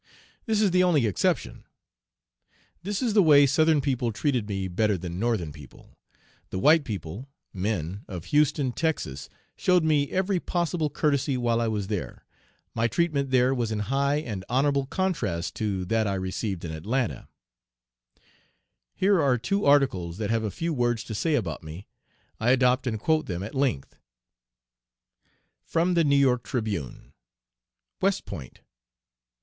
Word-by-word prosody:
This 215 -1 +2
is 200 - +3
the 180 +1 +4
only 160 -9 +3
exception. 105 -5 -1 1.2
This 200 +5 -3
is 230 -4 +1
the 205 - +6
way 145 -4 +7
Southern 155 +2 +3
people 125 -4 -1
treated 115 -1 -1
me 95 -1 -2
better 105 +2 +1
than 85 0 -6
Northern 110 -9 -1
people. 75 -3 -15 0.5
The - - -4
white 150 - +5
people 105 - -6 0.2
(men) 95 -1 -3
of 90 -3 -7
Houston, 145 -2 +2
Texas, 120 - -3 0.3
showed 180 -2 +3
me 150 -3 +2
every 190 0 0
possible 170 -3 -1
courtesy 140 -2 0
while 120 -1 +1
I 115 - 0
was 105 -3 -2
there. 100 -2 -5 0.5
My 115 0 +1
treatment 145 -2 0
there 130 0 +3
was 120 -4 -1
in 110 - -1 0.2
high 140 +1 +2
and 115 -11 -4
honorable 140 +2 +1
contrast 130 - -2
to 100 -4 -2
that 110 +3 +1
I 100 - -1
received 95 0 -3
in 80 - -5
Atlanta. 110 +10 -2 1.7
Here 190 -2 +3
are 135 -3 +3
two 195 - -1
articles 130 -13 +2
that 105 0 -2
have 115 -1 +1
a 110 - -1
few 165 - -3
words 120 -3 0
to 110 - -7
say 155 +9 0
about - - -2
me. 80 +5 -9 0.5
I 110 - +1
adopt 125 0 +3
and 110 -3 -2
quote 155 +6 +1
them 90 0 -4
at 105 - -7
length: 135 - -1 1.7
(From 170 +2 +1
the 170 -1 +3
New 140 -2 +3
York 130 -3 +3
Tribune.) 105 - -4 0.9
WEST - - +1
POINT. 65 - -9
125 Hz, 155 wpm, -26 LUFS, 100-150 Hz, 1.7 s, way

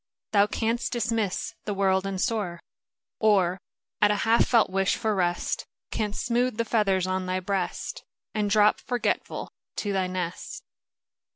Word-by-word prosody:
Thou 205 -1 +5
canst 230 +3 -1
dismiss 230 -5 -1
the 205 - -2
world 190 0 +2
and 195 -1 -3
soar, 200 -6 -1 0.6
Or, 195 -4 +3 0.4
at 205 - +6
a 210 - +3
half 225 +1 +4
felt 230 -5 +4
wish 195 0 +2
for 220 -3 0
rest. 175 -3 -1 0.2
Canst 210 -2 -2
smooth 240 0 +1
the 230 - 0
feathers 195 -5 +2
on 185 0 -1
thy 185 0 0
breast, 195 - -3 0.3
And 210 -1 0
drop, 210 0 +4
forgetful, 245 -1 -2 0.2
to 205 -1 -2
thy 190 -1 +1
nest. 180 -1 -4
205 Hz, 150 wpm, -27 LUFS, 185-225 Hz, 0.6 s, at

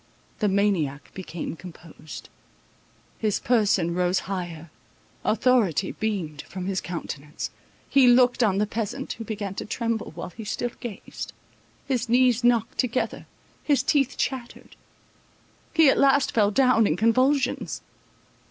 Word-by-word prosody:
The 210 - +2
maniac 190 -8 0
became 170 -3 -6
composed; 165 -3 -11 0.9
his 215 -2 0
person 205 -8 +2
rose 180 +1 +1
higher; 175 -4 -5 0.5
authority 215 - +2
beamed 180 -9 -3
from 185 -1 -5
his 190 -1 -1
countenance. 150 -4 -6 0.4
He 270 -2 +5
looked 245 0 +5
on 205 -5 +3
the 210 - +2
peasant, 210 0 -4
who 225 - -7
began 205 -3 -4
to - - -5
tremble, 230 0 -2
while 175 - -6
he 220 +6 -9
still 240 +3 -2
gazed; 235 -6 -7 0.5
his 250 -3 -1
knees 245 -1 +4
knocked 235 -2 +2
together; 250 -1 -1 0.4
his 280 -4 +2
teeth 275 -2 +1
chattered. 250 -3 -4 1.0
He 320 -2 +5
at 270 - +4
last 275 0 +4
fell 210 -3 +3
down 230 -1 +4
in 155 - 0
convulsions. 255 +7 +1
215 Hz, 130 wpm, -25 LUFS, 180-245 Hz, 1.0 s, He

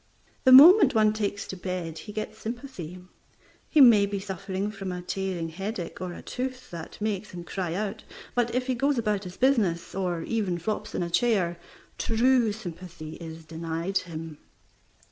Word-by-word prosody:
The 260 - +7
moment 310 - +9
one 215 -1 +4
takes 205 -2 -2
to - - -6
bed 180 -3 -4
he 210 - -9
gets 215 +1 -5
sympathy. 225 - -6 0.7
He 305 - +5
may 220 -6 +8
be 200 0 -3
suffering 195 +1 -4
from 195 -3 -5
a 180 0 -5
tearing 185 -3 -3
headache 190 +1 -5
or 180 -1 -3
a - - -10
tooth 255 0 -5
that 165 -2 -8
makes 210 -1 -2
him 175 -1 -8
cry 175 -1 -3
out; 205 +1 -3 0.3
but 240 -1 0
if 255 0 0
he 260 - 0
goes 275 +3 +1
about 210 -3 0
his 180 0 -9
business, 220 -11 +2
or 180 -3 -2
even 200 -5 -1
flops 210 +6 -4
in - - 0
a 170 - -3
chair, 185 -6 +1 0.4
true 235 0 +3
sympathy 175 -6 -8
is 165 -1 -9
denied 165 +3 -2
him. 160 -3 -8
195 Hz, 170 wpm, -27 LUFS, 175-225 Hz, 0.7 s, moment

